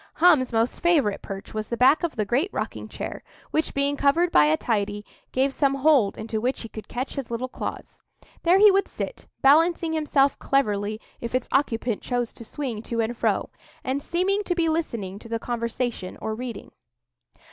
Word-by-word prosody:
Hum's 310 -7 +5
most 230 +1 0
favourite 295 - +2
perch 195 0 -8
was 215 -1 -3
the 235 - -3
back 265 +5 +5
of 340 -3 -2
the 215 - 0
great 265 - +1
rocking - - -4
chair, - - -6 0.3
which, 315 - -1
being 280 +1 +1
covered 320 +5 +2
by 150 - +6
a 155 +1 +3
tidy, 205 -1 -1 0.3
gave 270 +1 +1
some 275 -1 +2
hold 275 -7 +3
into 220 0 -3
which 255 +2 -1
he 230 - -8
could 220 - -9
catch 255 +2 -4
his 270 -4 -4
little 235 +2 -2
claws. - - -7 0.4
There 350 +2 +5
he 415 +1 +8
would 390 +1 +2
sit, - - -6 0.2
balancing 325 +4 +4
himself 290 -3 +2
cleverly 215 -5 0 0.2
if 235 +1 -4
its 255 - 0
occupant 235 -4 0
chose 245 -2 -2
to - - -10
swing 235 -2 -4
to 230 0 -4
and 225 +1 0
fro, - - 0 0.3
and 265 +2 -1
seeming 380 +6 0
to 355 - 0
be 335 -2 +1
listening 230 - -2
to 230 - -12
the 230 - -1
conversation 235 -3 -3
or 220 - -3
reading. 240 +1 -6
255 Hz, 190 wpm, -25 LUFS, 225-305 Hz, 0.4 s, he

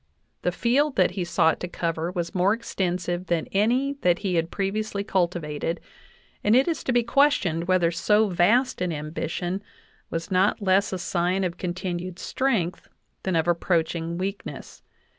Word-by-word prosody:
The - - +1
field 270 +4 +1
that - - +3
he 190 - -3
sought 165 -1 +2
to 180 - -4
cover 165 -1 -2
was 175 -2 -3
more 190 +3 +3
extensive 180 -5 -2
than 170 -2 0
any 250 +8 +1
that 175 -1 +3
he 185 - +1
had 165 -1 +1
previously 200 +1 -2
cultivated, 170 -4 -1 0.6
and 210 +2 +4
it 260 +2 +4
is 330 -2 -1
to - - +1
be 240 -1 +3
questioned 225 - +2
whether 180 -2 +3
so 210 +5 +3
vast 210 +7 +2
an 180 -1 0
ambition 165 +4 -3 0.5
was 165 +2 -4
not 190 +4 +3
less 195 0 +2
a 190 - -2
sign 180 +2 0
of 175 -1 -2
continued 180 0 -4
strength 215 -8 -1 0.3
than 190 -2 -1
of 160 0 +1
approaching 170 -1 0
weakness. 195 +2 -6
180 Hz, 160 wpm, -25 LUFS, 170-210 Hz, 0.6 s, and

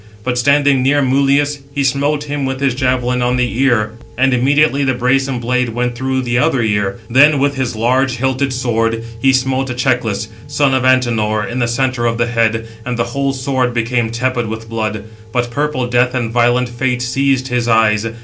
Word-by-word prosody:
But 125 +1 -1
standing 140 +1 +3
near 140 +2 +2
Mulius, 140 +2 +1 0.2
he 140 - 0
smote 145 +2 0
him 145 -1 -4
with 130 0 -2
his 135 -2 +1
javelin 125 -1 0
on 125 +1 +1
the 125 -1 -1
ear, 120 -6 +2 0.3
and 135 +1 +2
immediately 140 +3 +2
the 130 -2 +1
brazen 130 +1 0
blade 125 +1 -1
went 120 +2 -2
through 130 +2 -2
the 120 0 0
other 135 -4 +1
ear. 105 -1 -1
Then, 145 +5 +5
with 140 +1 +1
his 130 -4 -2
large 130 +4 +1
hilted 130 +2 -1
sword, 115 -3 -1 0.2
he 135 - +4
smote 130 0 0
Echeclus, 120 -4 -1 0.2
son 145 -1 +1
of 130 -1 +1
Antenor, 115 -5 +2
in 120 +4 -4
the 120 - +1
centre 120 0 0
of 115 0 -1
the 120 - +1
head, 115 -1 0 0.2
and 125 0 -3
the 115 - +1
whole 140 0 0
sword 130 -2 -1
became 120 0 0
tepid 120 0 -1
with 110 +1 -6
blood; 110 -2 -3 0.3
but 120 0 -1
purple 145 -1 -1
Death 125 +1 +1
and 120 -3 -2
violent 120 +1 +2
Fate 125 +1 -2
seized 135 +1 0
his 120 -1 -1
eyes. 110 -1 +2
125 Hz, 190 wpm, -16 LUFS, 120-135 Hz, 0.3 s, Then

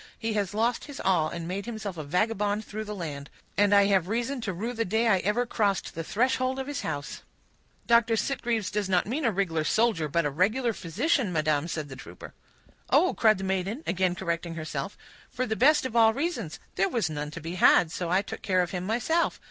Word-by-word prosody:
"He 225 -1 -2
has 205 -2 -1
lost 230 +2 0
his 285 - -9
all, 170 -5 +2
and 170 0 -6
made 195 +4 -4
himself 215 -5 -5
a 155 - -5
vagabond 205 +6 0
through 215 +1 -5
the 210 0 -5
land; 145 -6 -6 0.3
and 205 0 +3
I 200 -1 +6
have 190 -3 +2
reason 240 +5 -2
to 205 - -2
rue 215 +7 -4
the 230 -1 -1
day 225 +4 +1
I 195 -4 +4
ever 210 +6 0
crossed 205 -5 0
the 165 - -4
threshold 255 +6 0
of 265 - -3
his 290 -1 -4
house." 145 -2 -5 0.6
"Dr. 235 -1 +4
Sitgreaves 230 -4 -1
does 205 -2 -1
not 180 -2 +2
mean 270 +7 -2
a 230 - +3
rig'lar 175 -5 0
soldier, 215 -4 +2
but 170 +2 0
a 145 - 0
regular 220 - +1
physician, 220 - 0
madam," 155 -1 +1
said 155 -3 -4
the 135 - -9
trooper. 130 - -11 0.6
"Oh!" 370 - +4
cried 215 -3 +4
the 190 - -6
maiden, 190 - -2
again 185 -1 +1
correcting 170 -2 -3
herself, 155 +1 -5 0.3
"for 255 - -2
the 220 - -2
best 285 +5 +4
of 245 -3 -4
all 225 -1 +5
reasons; 270 - -3 0.2
there 195 +1 +2
was 230 -8 0
none 150 -1 -4
to 155 - -8
be 165 +2 -6
had, 175 -2 +5
so 175 0 -3
I 185 +3 +2
took - - -7
care 185 -2 +2
of 175 - -5
him 180 -1 -3
myself. 245 +10 0
200 Hz, 220 wpm, -27 LUFS, 170-230 Hz, 0.6 s, I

